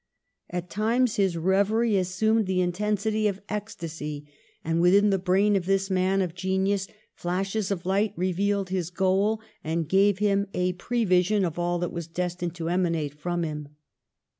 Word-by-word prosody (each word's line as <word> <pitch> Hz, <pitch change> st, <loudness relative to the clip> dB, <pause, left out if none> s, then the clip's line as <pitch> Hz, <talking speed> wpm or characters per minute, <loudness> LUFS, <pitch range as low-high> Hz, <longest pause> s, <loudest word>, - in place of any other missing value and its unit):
At 180 Hz, 0 st, -4 dB
times 230 Hz, +4 st, +1 dB
his 190 Hz, -4 st, +2 dB
reverie 200 Hz, +6 st, +2 dB
assumed 200 Hz, +4 st, +1 dB
the 185 Hz, -1 st, +1 dB
intensity 210 Hz, +4 st, 0 dB
of 200 Hz, -1 st, -2 dB
ecs 210 Hz, +1 st, -5 dB
tacy; 150 Hz, -3 st, -6 dB, 0.4 s
and 165 Hz, +1 st, +1 dB
within 200 Hz, +4 st, +5 dB
the 195 Hz, -, +2 dB
brain 195 Hz, +3 st, +3 dB
of 185 Hz, -2 st, -1 dB
this 195 Hz, 0 st, +1 dB
man 190 Hz, +1 st, +2 dB
of 175 Hz, -3 st, -4 dB
genius 190 Hz, +2 st, 0 dB, 0.3 s
flashes 195 Hz, +3 st, -2 dB
of 185 Hz, -4 st, -3 dB
light 200 Hz, +2 st, +1 dB
revealed 190 Hz, +2 st, 0 dB
his 180 Hz, -3 st, -2 dB
goal, 190 Hz, +4 st, +1 dB, 0.2 s
and 160 Hz, 0 st, -1 dB
gave 195 Hz, +3 st, +3 dB
him 200 Hz, 0 st, +1 dB
a 180 Hz, 0 st, +1 dB
prevision 195 Hz, -1 st, +1 dB
of 170 Hz, 0 st, -4 dB
ail 175 Hz, 0 st, 0 dB
that 175 Hz, 0 st, -3 dB
was 170 Hz, -2 st, -5 dB
destined 175 Hz, 0 st, -3 dB
to 165 Hz, -2 st, -4 dB
emanate 170 Hz, -5 st, 0 dB
from 175 Hz, +3 st, -2 dB
him. 150 Hz, -2 st, -6 dB
185 Hz, 165 wpm, -26 LUFS, 175-200 Hz, 0.4 s, within